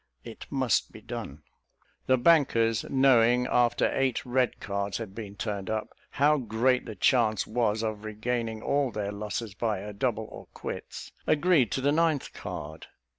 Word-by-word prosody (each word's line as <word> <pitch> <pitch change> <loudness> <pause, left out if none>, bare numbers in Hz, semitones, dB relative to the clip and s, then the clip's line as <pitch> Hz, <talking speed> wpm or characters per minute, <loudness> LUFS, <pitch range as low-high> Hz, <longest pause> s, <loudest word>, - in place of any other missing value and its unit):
It 115 - -10
must 130 -6 +1
be - - -11
done." - - -7 0.6
The 130 - +4
bankers 120 -7 +3
knowing, 125 -2 +4
after 120 -1 +2
eight 135 -3 0
red 125 -1 0
cards 100 0 -3
had 110 -4 -7
been 105 -2 -8
turned 100 -2 -4
up, 110 0 -2 0.2
how 150 +2 +3
great 125 +1 +1
the 110 - -6
chance 110 0 +2
was 110 -1 0
of 110 -1 -3
regaining 110 +1 -3
all 140 -2 +1
their 105 -2 -3
losses 105 +1 -4
by 110 +1 -1
a 105 +2 -7
double 110 0 -1
or - - -10
quits, - - -7 0.2
agreed 155 - +3
to 135 - -1
the 140 +2 +2
ninth 160 -2 +1
card. 80 +2 -7
115 Hz, 160 wpm, -28 LUFS, 105-130 Hz, 0.6 s, The